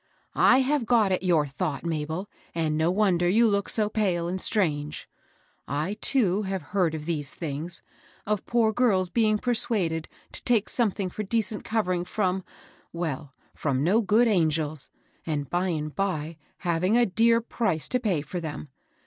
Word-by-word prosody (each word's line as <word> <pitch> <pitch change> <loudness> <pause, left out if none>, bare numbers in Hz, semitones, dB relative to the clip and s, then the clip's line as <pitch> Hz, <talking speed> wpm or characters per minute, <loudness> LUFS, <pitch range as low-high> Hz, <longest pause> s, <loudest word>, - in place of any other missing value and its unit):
" - - -46 0.2
I 265 - +4
have 265 -2 0
got 225 -5 +4
at 185 - +1
your 170 -5 +3
thought, 140 +3 -3
Mabel; 160 +3 -3 0.3
and 160 -2 0
no 160 +2 +2
wonder 180 -3 +2
you 225 +5 +5
look 200 -2 0
so 215 -2 +1
pale 190 -6 0
and 185 +2 -2
strange 150 -8 0 0.6
I 145 +5 -1
I, - - -2
too, 210 -8 +3
have 190 -4 -3
heard 180 -5 +2
of 150 -1 -6
these 150 -4 -3
things, 160 +2 -4 0.2
— - - -29
of 210 -1 -2
poor 230 -2 +2
girls 195 -7 +2
being 215 -2 +3
persuaded 205 -9 0 0.2
to - - -4
take 230 -4 +2
something 200 -5 0
for 215 - -5
decent 215 0 -1
covering 185 -6 0
from, 185 0 -1 0.3
— - - -29
well, 155 -5 -4 0.2
from 135 -2 -1
no 200 +8 +3
good 220 +4 +3
angels, 155 -6 +1 0.2
— - - -38
and, 145 -3 -2
by 180 +2 +1
and 155 -3 -3
by, 170 -5 -2 0.2
having 180 +5 +1
a 240 - +5
dear 230 +3 +3
price 205 -8 -1
to 250 - +1
pay 190 -11 0
for 175 +5 -5
them. 155 -2 -6
185 Hz, 180 wpm, -26 LUFS, 160-215 Hz, 0.6 s, you